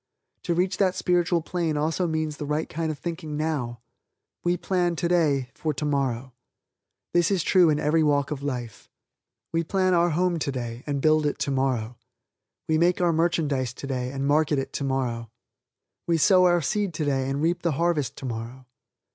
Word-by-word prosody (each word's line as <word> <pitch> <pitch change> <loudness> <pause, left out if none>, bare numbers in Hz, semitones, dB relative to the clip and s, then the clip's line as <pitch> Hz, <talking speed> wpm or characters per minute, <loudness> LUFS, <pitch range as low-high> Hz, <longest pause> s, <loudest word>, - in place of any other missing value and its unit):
To 170 - 0
reach 180 +2 0
that 190 -2 +2
spiritual 175 -2 +1
plane 165 -3 -1
also 160 +4 0
means 155 -2 -2
the 150 - -5
right 150 +2 -1
kind 160 0 -3
of 150 - -6
thinking 160 -1 -5
now. 135 -7 -2 0.6
We 175 0 +1
plan, 175 -2 0
today, 155 -7 +1
for 155 -2 -3
tomorrow. 135 -4 -1 0.8
This 175 -1 +3
is 190 -5 +1
true 180 -4 +5
in 150 -1 +2
every 155 +2 +2
walk 145 -1 +2
of 145 -2 -3
life. 125 -6 -5 0.6
We 165 0 +1
plan 185 +2 +1
our 175 0 +4
home 175 +1 +1
today 125 -5 -4
and 140 -2 -2
build 155 -1 +4
it 145 - -2
tomorrow. 130 -4 -1 0.7
We 155 0 +2
make 175 +1 +3
our 175 -2 +2
merchandise 150 -6 0
today 130 -2 -3
and 135 0 -3
market 150 +1 +2
it 135 - -3
tomorrow. 130 -4 -2 0.8
We 170 -1 +3
sow 185 +2 +5
our 175 -2 +3
seed 200 +3 -1
today 135 -4 0
and 135 +1 -1
we 160 +3 +2
reap 175 +1 -2
the 170 -3 0
harvest 165 -2 0
tomorrow. 120 +1 -6
155 Hz, 170 wpm, -25 LUFS, 135-170 Hz, 0.8 s, true